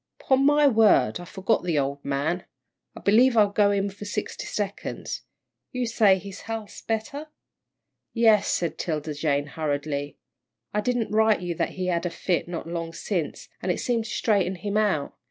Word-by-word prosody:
"'Pon 265 Hz, 0 st, +2 dB
my 295 Hz, +1 st, +5 dB
word, 215 Hz, -, +4 dB
I 175 Hz, -, -8 dB
forgot 195 Hz, +4 st, 0 dB
the 170 Hz, -4 st, 0 dB
old 140 Hz, 0 st, -1 dB
man. 145 Hz, +6 st, -1 dB, 0.5 s
I -, -, -9 dB
believe 235 Hz, +4 st, +4 dB
I'll 205 Hz, -2 st, +5 dB
go 205 Hz, 0 st, +4 dB
in 200 Hz, 0 st, 0 dB
for 200 Hz, +2 st, -10 dB
sixty 210 Hz, +1 st, -4 dB
seconds. 205 Hz, -1 st, -4 dB, 0.5 s
You 250 Hz, -1 st, -1 dB
say 215 Hz, -4 st, +4 dB
his 195 Hz, +1 st, -9 dB
health's 220 Hz, -2 st, -5 dB
better?" 230 Hz, +7 st, -3 dB, 0.8 s
"Yes," 220 Hz, -3 st, +4 dB
said 170 Hz, -2 st, -1 dB
'Tilda 155 Hz, -2 st, -2 dB
Jane, 145 Hz, -1 st, 0 dB
hurriedly, 145 Hz, -1 st, -3 dB, 0.6 s
"I 210 Hz, -, +1 dB
didn't 245 Hz, 0 st, -1 dB
write 220 Hz, -1 st, +3 dB
you 175 Hz, -1 st, -2 dB
that -, -, -2 dB
he 185 Hz, -, -3 dB
had 175 Hz, -1 st, 0 dB
a -, -, -2 dB
fit 175 Hz, 0 st, -1 dB
not 170 Hz, -2 st, -5 dB
long 165 Hz, -1 st, -4 dB
sence, 170 Hz, -4 st, -3 dB
and 180 Hz, -, 0 dB
it -, -, -2 dB
seemed 235 Hz, -3 st, 0 dB
to -, -, -7 dB
straighten 200 Hz, -4 st, +1 dB
him 205 Hz, +2 st, -4 dB
out. 205 Hz, -9 st, +1 dB
195 Hz, 175 wpm, -25 LUFS, 165-220 Hz, 0.8 s, my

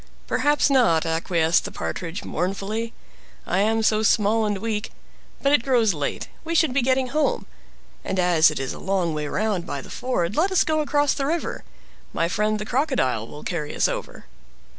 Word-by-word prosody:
"Perhaps 290 Hz, 0 st, +2 dB
not," 230 Hz, -12 st, +4 dB
acquiesced 165 Hz, 0 st, +1 dB
the -, -, -6 dB
Partridge 180 Hz, +1 st, -5 dB
mournfully, 200 Hz, +6 st, -3 dB, 0.5 s
"I 185 Hz, -, 0 dB
am 220 Hz, +2 st, +2 dB
so 215 Hz, 0 st, +3 dB
small 220 Hz, 0 st, +3 dB
and 205 Hz, -1 st, -1 dB
weak. 220 Hz, +1 st, -3 dB, 0.5 s
But 275 Hz, -, +3 dB
it 290 Hz, -, +5 dB
grows 235 Hz, -5 st, +2 dB
late—we 170 Hz, -, -4 dB
should 315 Hz, -5 st, +3 dB
be 275 Hz, -, +2 dB
getting 260 Hz, +1 st, +1 dB
home; 305 Hz, +4 st, 0 dB, 0.6 s
and 190 Hz, -, -3 dB
as 175 Hz, -3 st, +5 dB
it 155 Hz, -, -4 dB
is 135 Hz, -1 st, -3 dB
a -, -, -9 dB
long 185 Hz, -4 st, 0 dB
way 150 Hz, -1 st, -3 dB
round 195 Hz, -1 st, -1 dB
by 140 Hz, -, -3 dB
the -, -, -11 dB
ford, 205 Hz, -7 st, -1 dB
let 365 Hz, +5 st, +2 dB
us 375 Hz, -, +4 dB
go 310 Hz, 0 st, 0 dB
across 290 Hz, -1 st, +2 dB
the 275 Hz, -, -2 dB
river. 335 Hz, +3 st, -2 dB, 0.5 s
My 165 Hz, -, +1 dB
friend 210 Hz, +4 st, 0 dB
the 210 Hz, -, -5 dB
Crocodile 235 Hz, -, 0 dB
will 150 Hz, -, -10 dB
carry 155 Hz, -4 st, -4 dB
us -, -, +3 dB
over." -, -, -6 dB
215 Hz, 185 wpm, -23 LUFS, 170-260 Hz, 0.6 s, it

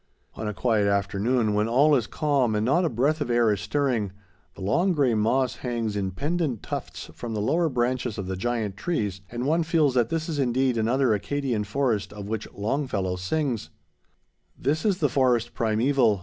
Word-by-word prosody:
On 110 Hz, +1 st, -5 dB
a 105 Hz, -, -2 dB
quiet 110 Hz, -4 st, +2 dB
afternoon, 105 Hz, +3 st, +1 dB
when 105 Hz, +1 st, +1 dB
all 140 Hz, +6 st, +4 dB
is 125 Hz, -6 st, +2 dB
calm 140 Hz, -7 st, +1 dB
and 105 Hz, +1 st, +1 dB
not 170 Hz, +9 st, +3 dB
a 170 Hz, -, +2 dB
breath 140 Hz, +7 st, +1 dB
of 135 Hz, -, -2 dB
air 120 Hz, -2 st, +3 dB
is 100 Hz, -, -4 dB
stirring, 120 Hz, -3 st, 0 dB, 0.4 s
the -, -, -11 dB
long, 170 Hz, -, +2 dB
gray 140 Hz, -6 st, +2 dB
moss 120 Hz, +4 st, +1 dB
hangs 115 Hz, -4 st, -2 dB
in 100 Hz, -2 st, -1 dB
pendent 145 Hz, -, -2 dB
tufts -, -, -6 dB
from 115 Hz, -2 st, -5 dB
the -, -, -1 dB
lower 160 Hz, +10 st, +1 dB
branches 125 Hz, -2 st, -1 dB
of 100 Hz, -, -3 dB
the 95 Hz, 0 st, -3 dB
giant 110 Hz, 0 st, -2 dB
trees, 105 Hz, -, -2 dB
and 120 Hz, +1 st, -4 dB
one 160 Hz, +4 st, +2 dB
feels 160 Hz, -4 st, +2 dB
that 120 Hz, -3 st, +2 dB
this 160 Hz, -1 st, -2 dB
is 155 Hz, -4 st, -3 dB
indeed 130 Hz, -1 st, +1 dB
another 120 Hz, +2 st, +2 dB
Acadian 120 Hz, +1 st, -1 dB
forest 105 Hz, -3 st, -1 dB
of 105 Hz, -1 st, -7 dB
which 110 Hz, 0 st, -4 dB
Longfellow 105 Hz, -4 st, -1 dB
sings: 120 Hz, +5 st, -2 dB, 0.9 s
"This 150 Hz, +7 st, -1 dB
is 200 Hz, -4 st, +2 dB
the 150 Hz, -, +2 dB
forest 125 Hz, -4 st, +1 dB
primeval. 115 Hz, -1 st, +2 dB
120 Hz, 190 wpm, -25 LUFS, 105-140 Hz, 0.9 s, all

